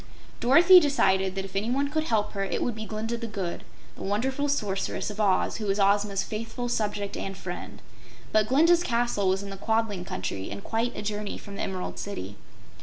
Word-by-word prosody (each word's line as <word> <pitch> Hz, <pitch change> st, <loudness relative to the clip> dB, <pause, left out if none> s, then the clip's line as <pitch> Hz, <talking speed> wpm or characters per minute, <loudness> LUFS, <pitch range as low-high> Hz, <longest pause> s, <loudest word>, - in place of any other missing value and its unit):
Dorothy 335 Hz, +9 st, +8 dB
decided 195 Hz, -, +2 dB
that 195 Hz, 0 st, -3 dB
if 195 Hz, 0 st, -11 dB
anyone 250 Hz, +8 st, 0 dB
could 310 Hz, +1 st, -1 dB
help 215 Hz, -6 st, +1 dB
her 195 Hz, -1 st, -2 dB
it 195 Hz, -, -1 dB
would 245 Hz, -, 0 dB
be 220 Hz, 0 st, -6 dB
Glinda 225 Hz, +2 st, -3 dB
the 230 Hz, 0 st, -5 dB
Good, 195 Hz, -5 st, -4 dB, 0.3 s
the -, -, -12 dB
wonderful 260 Hz, +8 st, 0 dB
Sorceress 205 Hz, -5 st, -1 dB
of 210 Hz, +1 st, -4 dB
Oz 195 Hz, -3 st, +2 dB
who 215 Hz, -2 st, -4 dB
was 195 Hz, +1 st, +1 dB
Ozma's 200 Hz, 0 st, +2 dB
faithful 230 Hz, +3 st, -4 dB
subject 210 Hz, -3 st, -1 dB
and 195 Hz, -1 st, -5 dB
friend. 180 Hz, -2 st, -7 dB, 0.5 s
But 215 Hz, -1 st, +3 dB
Glinda's 330 Hz, +7 st, +5 dB
castle 235 Hz, -, +1 dB
was 190 Hz, +1 st, 0 dB
in 200 Hz, -, -7 dB
the 195 Hz, -, -7 dB
Quadling 220 Hz, -3 st, 0 dB
Country 95 Hz, -, -4 dB
and 100 Hz, 0 st, -7 dB
quite 230 Hz, +2 st, -1 dB
a -, -, -4 dB
journey 210 Hz, 0 st, -3 dB
from 200 Hz, -, -10 dB
the -, -, -4 dB
Emerald 185 Hz, -2 st, -4 dB
City. 100 Hz, -, -5 dB
210 Hz, 195 wpm, -27 LUFS, 195-240 Hz, 0.5 s, Dorothy